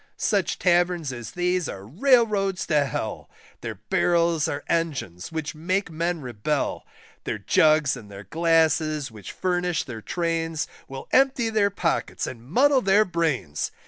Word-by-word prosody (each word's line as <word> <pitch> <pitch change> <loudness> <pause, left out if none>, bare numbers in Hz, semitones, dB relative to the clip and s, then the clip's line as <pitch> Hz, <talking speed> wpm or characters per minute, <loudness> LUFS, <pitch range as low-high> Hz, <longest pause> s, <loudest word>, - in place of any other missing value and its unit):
Such - - 0
Taverns 175 -5 +2
as 120 -3 -7
these 180 -2 0
are 95 0 -7
Railroads 205 - +2
to 150 -3 +2
Hell, 135 - -4 0.3
Their - - -5
barrels 170 -2 +1
are 145 0 -3
engines 140 - -2
which 160 -2 -4
make 180 +4 -1
men 170 +1 -2
rebel; 130 +3 -2 0.4
Their - - -2
jugs 150 +7 +3
and 110 -5 -11
their 100 0 -9
glasses 160 - +1
which 105 -5 -9
furnish 180 -3 -1
their 115 -5 -8
Trains, 165 +1 -2 0.2
Will 135 0 -8
empty 265 -4 +3
their 210 -2 +3
pockets 180 -4 -1
and 120 -3 -7
muddle 260 - +3
their 200 +1 +4
brains. 155 - -1
165 Hz, 145 wpm, -25 LUFS, 140-180 Hz, 0.4 s, their